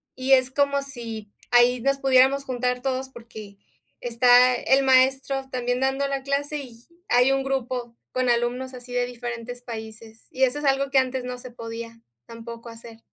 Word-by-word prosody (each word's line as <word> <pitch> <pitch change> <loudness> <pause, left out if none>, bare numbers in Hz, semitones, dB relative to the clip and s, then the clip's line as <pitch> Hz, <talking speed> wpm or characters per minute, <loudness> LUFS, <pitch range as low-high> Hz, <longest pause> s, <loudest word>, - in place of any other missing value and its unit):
Y 260 +1 -2
es 255 -1 +4
como 280 +1 +1
si 230 -6 -8 0.2
ahí 245 0 +4
nos 275 +1 +1
pudiéramos 270 +1 +4
juntar 250 -1 -2
todos 265 0 -2
porque 220 -5 -12 0.4
está 245 +1 +5
el 265 +3 +2
maestro 265 +1 +2
también 245 0 -1
dando 270 +1 0
la 275 -1 -3
clase 285 +2 -2
y 250 -5 -10 0.3
hay 250 +2 +4
un 270 0 +1
grupo 250 -3 -3 0.2
con 255 -1 0
alumnos 240 +2 0
así 245 0 -10
de 245 0 +1
diferentes 245 0 -7
países, 220 -1 -10
y 265 - -1
eso 260 +3 +2
es 295 - -5
algo 275 0 +2
que 270 -1 +4
antes 255 -1 -2
no 250 0 -5
se 245 0 -10
podía 230 0 -8 0.2
tampoco 230 0 -10
hacer. 230 0 -11
250 Hz, 175 wpm, -24 LUFS, 235-270 Hz, 0.4 s, está